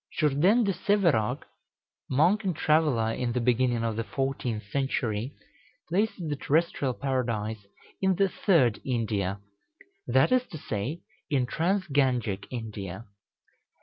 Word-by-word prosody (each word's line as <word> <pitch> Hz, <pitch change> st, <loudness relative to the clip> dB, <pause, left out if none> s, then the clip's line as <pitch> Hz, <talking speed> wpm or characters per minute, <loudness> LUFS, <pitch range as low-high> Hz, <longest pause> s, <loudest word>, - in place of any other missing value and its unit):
Jourdain 170 Hz, -, +3 dB
de 200 Hz, -2 st, +1 dB
Sèverac, 175 Hz, -, +1 dB, 0.7 s
monk 175 Hz, +11 st, +3 dB
and 185 Hz, -4 st, -1 dB
traveller 150 Hz, -8 st, +2 dB
in 120 Hz, -1 st, -2 dB
the 125 Hz, -, 0 dB
beginning 120 Hz, -1 st, +2 dB
of 115 Hz, -2 st, -1 dB
the 115 Hz, -, -1 dB
fourteenth 130 Hz, -3 st, -2 dB
century, 130 Hz, -3 st, -1 dB, 0.5 s
places 190 Hz, -1 st, 0 dB
the 150 Hz, -, -1 dB
terrestrial 145 Hz, -3 st, 0 dB
Paradise 115 Hz, -6 st, -2 dB, 0.3 s
in 190 Hz, -1 st, +3 dB
the 195 Hz, +2 st, +3 dB
"Third 160 Hz, -, +2 dB
India;" 105 Hz, -6 st, -1 dB, 0.7 s
that 130 Hz, -, +3 dB
is 255 Hz, 0 st, +3 dB
to 160 Hz, -, -8 dB
say, 135 Hz, +5 st, -4 dB, 0.3 s
in 135 Hz, -4 st, +2 dB
trans 185 Hz, +8 st, 0 dB
Gangic 125 Hz, -, 0 dB
India. 105 Hz, -4 st, -6 dB
130 Hz, 125 wpm, -27 LUFS, 115-165 Hz, 0.7 s, Jourdain